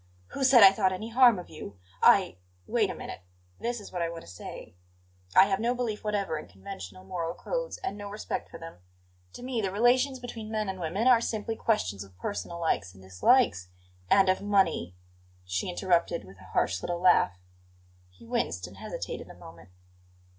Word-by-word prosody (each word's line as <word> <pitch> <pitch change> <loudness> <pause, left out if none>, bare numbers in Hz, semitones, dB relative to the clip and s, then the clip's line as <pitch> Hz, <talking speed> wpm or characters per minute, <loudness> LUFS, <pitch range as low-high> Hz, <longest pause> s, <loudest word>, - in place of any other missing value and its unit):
"Who 275 - -4
said 255 -4 +7
I 195 - +11
thought 195 -1 +1
any 215 +5 -5
harm 240 -2 +6
of 180 - -8
you? 100 -10 -9 0.2
I - - +5
" 90 0 -36
"Wait - - +3
a - - -4
minute. - - -8 0.4
This 240 0 -2
is 205 - -11
what 180 - -3
I 170 - 0
want 165 0 -7
to - - -15
say: 90 -1 -9 0.6
I 190 - +9
have 195 -1 0
no 240 +3 0
belief 230 -4 -3
whatever 200 -7 -1
in - - -10
conventional 95 0 -9
moral 165 - -4
codes, - - -4
and 380 - -4
no 205 0 -6
respect 210 +1 -5
for - - -9
them. 165 - -10 0.5
To - - -10
me 250 -3 -2
the 195 - -1
relations 250 +6 +3
between 235 -3 -8
men 215 -2 -2
and 190 -1 -5
women 180 +7 -2
are 250 -3 +6
simply 225 -1 -2
questions 100 - -1
of 95 -2 -18
personal 170 - -5
likes 105 - -1
and 95 - -15
dislikes 95 - +3 0.2
" 90 0 -31
"And 195 -1 +5
of 185 0 +2
money," 195 - +1 0.5
she 90 - -2
interrupted 175 -2 +1
with 95 0 -15
a 95 - -14
harsh 95 0 0
little 175 0 -3
laugh. 175 - +4 0.7
He 90 +5 -18
winced 90 -5 -2
and 90 - -12
hesitated - - -6
a - - -11
moment. 80 +1 -14
185 Hz, 195 wpm, -28 LUFS, -, 0.7 s, I